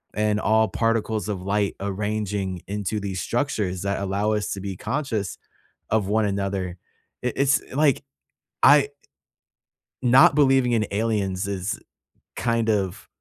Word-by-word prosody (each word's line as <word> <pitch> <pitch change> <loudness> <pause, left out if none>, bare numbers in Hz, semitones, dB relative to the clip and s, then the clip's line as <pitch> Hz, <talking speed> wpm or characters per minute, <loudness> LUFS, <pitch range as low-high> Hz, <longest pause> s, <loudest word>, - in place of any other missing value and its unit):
And 105 0 +1
all 110 +1 +3
particles 110 0 0
of 95 -3 -3
light 100 +1 0
arranging 100 -2 -2
into 105 +1 -2
these 95 -2 -3
structures 105 -8 -1
that 100 0 -1
allow 100 +2 0
us 105 -1 -1
to 100 - -5
be 95 0 -5
conscious 115 - -3 0.5
of 105 -3 +2
one 110 +1 +2
another. 100 -2 -2 0.4
It 125 - -1
it's 140 0 +3
like, 145 0 +2 0.6
I 145 - +9
i 140 0 -2 1.1
not 130 +3 +6
believing 135 -4 +4
in 110 -2 +2
aliens 100 -3 -1
is 95 -1 -3 0.6
kind 115 -1 0
of 95 -4 -1
105 Hz, 135 wpm, -24 LUFS, 100-115 Hz, 1.1 s, I